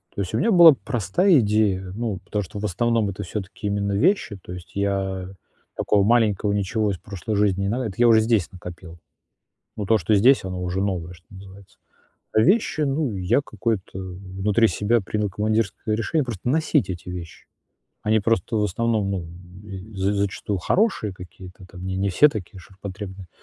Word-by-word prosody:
То 100 - -2
есть 95 +2 -4
у - - +1
меня 225 - +2
была 170 -5 +9
простая 135 - +2
идея, 100 -4 +1
ну 115 -4 -2
потому 105 0 -2
что 100 +3 -8
в 105 - -3
основном 115 +2 +1
это 95 - -5
всё-таки 100 +2 -5
именно 100 0 -1
вещи, 130 - +1
то - - -11
есть 90 -1 -11
я 95 -2 -1 0.5
такого 100 -1 +2
маленького 105 -2 +2
ничего 105 +1 0
из 95 - -4
прошлой 100 +3 -5
жизни 100 -2 +2
не 100 - 0
надо, 125 +2 -1
это 95 -3 -5
я 120 0 +5
уже 110 -1 +6
здесь 110 -5 +1
накопил. 85 -2 -10 0.8
Но 105 - -4
то, 110 +2 +4
что 105 +3 +1
здесь, 125 +7 +5
оно 90 -1 -4
уже 90 +1 -2
новое, 90 -3 -2
что 85 0 -19
называется. 100 0 -14 0.6
А - - +4
вещи, 180 - +2
ну, 135 -5 0
я 90 +8 +2
какое-то 110 -4 -3
в 95 0 -8
внутри 105 +3 +4
себя 115 +4 +1
принял 105 +2 -2
командирское 110 +1 -1
решение- 145 +6 0
просто 120 -2 -5
носить 155 -1 +2
эти 90 0 -7
вещи. 85 -3 -8 0.6
Они 110 0 +2
просто, 115 0 0
в 105 - +2
основном, 105 0 0
ну, 90 -4 -3 0.7
з 95 +2 +1
зачастую 100 0 -2
хорошие 180 - +1
какие-то 90 +1 -12
там, 90 0 -9
не 95 0 -3
не 100 +1 0
все 150 +11 +6
такие 100 - -7
ширпотребные. 95 0 -9
100 Hz, 180 wpm, -23 LUFS, 95-115 Hz, 0.8 s, была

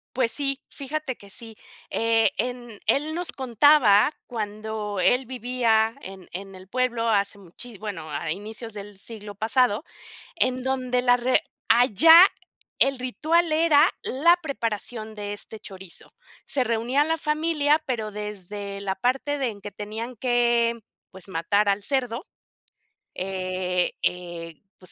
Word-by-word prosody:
Pues 245 -3 +2
sí, 275 +1 0
fíjate 285 -1 -4
que 200 - -16
sí, 225 +2 -7 0.4
eh, 225 +2 +3
en 240 -4 -4
él 300 +3 +2
nos 350 +1 -3
contaba 250 -4 +5 0.2
cuando 215 -2 -4
él 250 +8 +3
vivía 235 -3 +1
en 190 -1 -10
en 195 +2 -7
el 185 0 -13
pueblo 240 0 0
hace 200 -2 +1
muchí 200 +5 -9
bueno, 190 -6 -6
a 155 +2 -3
inicios 220 +5 -6
del 205 -1 -9
siglo 210 0 -7
pasado, 225 +3 +2 0.5
en 255 -5 +2
donde 255 -1 0
la 245 0 +5
re 245 +1 +2 0.3
allá 295 - +8 0.6
el 275 -1 +3
ritual 315 +7 +1
era 315 0 +5
la 335 +7 +4
preparación 225 -5 -3
de 205 -1 -5
este 205 +2 -7
chorizo. 190 -4 -9 0.3
Se 270 - 0
reunía 240 +4 +1
la 325 +1 0
familia, 305 -1 +1
pero 220 -5 -2
desde 205 -1 -6
la 195 -1 -2
parte 260 +7 0
de 265 -3 0
en 205 -3 -8
que 205 +1 -8
tenían 220 +5 -6
que, 235 -1 +2 0.3
pues, 190 -1 -7
matar 195 +4 +1
al 200 +1 +1
cerdo, 250 +1 -1 0.9
eh 185 -1 -1
eh, 170 -3 -3 0.2
pues, 185 - -11
230 Hz, 140 wpm, -25 LUFS, 200-260 Hz, 0.9 s, allá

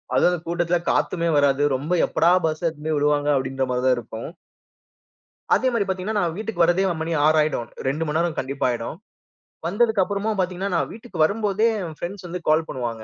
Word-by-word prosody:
அதுவும் 175 - +5
அந்த 180 - 0
கூட்டத்துல 175 0 +1
காத்துமே 170 -1 +1
வராது. 140 -1 +3
ரொம்ப 150 +7 -2
எப்படா 170 +2 +3
பஸ் 155 -1 -1
எடுத்துட்டு 155 -2 -3
போய் 155 - +1
விடுவாங்க 145 0 +1
அப்டின்ற 135 0 -1
மாரி 125 0 0
தான் 130 -1 +4
இருக்கும். 115 +1 -7 1.3
அதே 260 - +1
மாரி 210 -4 +1
பார்த்தீங்கன்னா, 190 +3 -2
நான் 170 -4 -1
வீட்டுக்கு 215 -5 0
வர்றதே 175 +3 +3 0.2
மணி 165 +1 -2
6 155 +1 +4
ஆயிடும். 150 -6 -1 0.4
2 155 - 0
நேரம் 170 -1 -1
கண்டிப்பா 135 +1 -2
ஆயிடும். 120 +5 -3 0.7
வந்ததக்கு 215 +2 +2
அப்புறமும் 205 +3 -1
பார்த்தீங்கன்னா 185 +1 -1
நான் 170 - 0
வீட்டுக்கு 230 +2 -10
வரும்போதே 210 +5 +2 0.2
என் 160 -2 -7
ஃபிரெண்ட்ஸ் 185 +1 -6
வந்து 175 +1 -5
கால் 155 +1 +3
பண்ணுவாங்க. 115 -3 -4
170 Hz, 180 wpm, -23 LUFS, 145-190 Hz, 1.3 s, அதுவும்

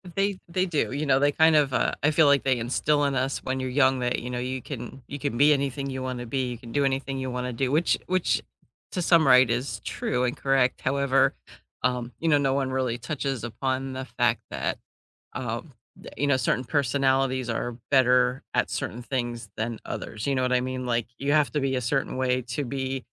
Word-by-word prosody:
They 195 -1 +1
they 185 +2 0
do, 160 -7 -1
you 145 +3 -2
know, 135 -1 +4
they 145 +1 +3
kind 160 +1 +4
of, 140 -4 +3
uh - - +1
I 150 - +4
feel, 155 -1 +5
like, 140 -1 +4
they 130 -2 +2
instill 145 +5 +1
in 140 -1 0
us 130 +1 0
when 130 0 -2
you're 130 0 -2
young 130 -1 +3
that, 125 0 0
you 125 - -6
know, 125 0 -3
you 130 0 -3
can 130 0 -7
you 145 - -6
can 140 -4 -2
be 150 +2 +6
anything 140 0 -2
you 130 -1 -4
wanna 125 -1 -4
be, 130 +1 -1
you 120 - -5
can 115 0 -11
do 140 +1 +2
anything 135 0 -1
you 130 -1 -3
wanna 125 0 -3
do, 130 +2 -1
which 160 +4 +2
which 145 -12 +1 0.5
to 180 - -2
some 165 -3 +4
right 125 -2 +7
is 125 +4 -2
true 125 -1 -2
and 125 - -1
correct, 135 -2 +1
however, 135 0 +2 0.5
um, 125 -1 0
you 165 - 0
know, 145 - +5
no 135 -2 +1
one 135 -1 0
really 130 -3 -1
touches 130 0 -3
upon 130 +3 -2
the 130 0 -5
fact - - 0
that, - - -2 0.6
um, - - -4 0.2
that, - - -12
you 145 - +1
know, 140 -2 +3
certain 130 0 0
personalities 135 -2 +1
are 120 +1 -2
better 125 -1 +4
at - - +1
certain 120 +3 -4
things 120 -3 -3
than 110 +1 -3
others, 110 +3 -5
you 140 - +1
know 130 - +1
what 125 0 0
I 125 - +4
mean? 130 0 -3
Like, 120 -2 0
you 140 +1 0
have 150 -2 +3
to 150 - 0
be 135 -1 0
a - - 0
certain 135 +3 -1
way 130 -1 +1
to 140 +4 -2
be, 130 0 -3
130 Hz, 225 wpm, -26 LUFS, 125-140 Hz, 0.6 s, right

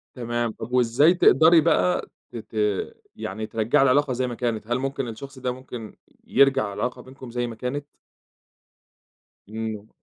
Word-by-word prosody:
تمام، 120 -2 -2
طَب 110 +2 -9
وإزاي 125 +6 +4
تقدري 165 -1 +6
بقى 90 - +1 0.2
ت - - -13
ت 110 - -11 0.6
يعني 110 +3 -5
ترجّعي 115 +7 +2
العلاقة 140 +1 +3
زي 125 +1 -1
ما 120 - -5
كانت، 115 -3 -2
هل 120 +1 0
ممكن 135 -1 -3
الشخص 130 +4 -9
ده 125 -1 -1
ممكن 125 -4 -9 0.3
ي - - -3
يرجع 135 -5 +5
العلاقة 125 +4 -3
بينكم 130 -1 -12
زي 120 0 -2
ما 115 - -7
كانت؟ 125 +5 -4 1.6
إمم. 110 -1 -5
125 Hz, 155 wpm, -24 LUFS, 115-135 Hz, 1.6 s, تقدري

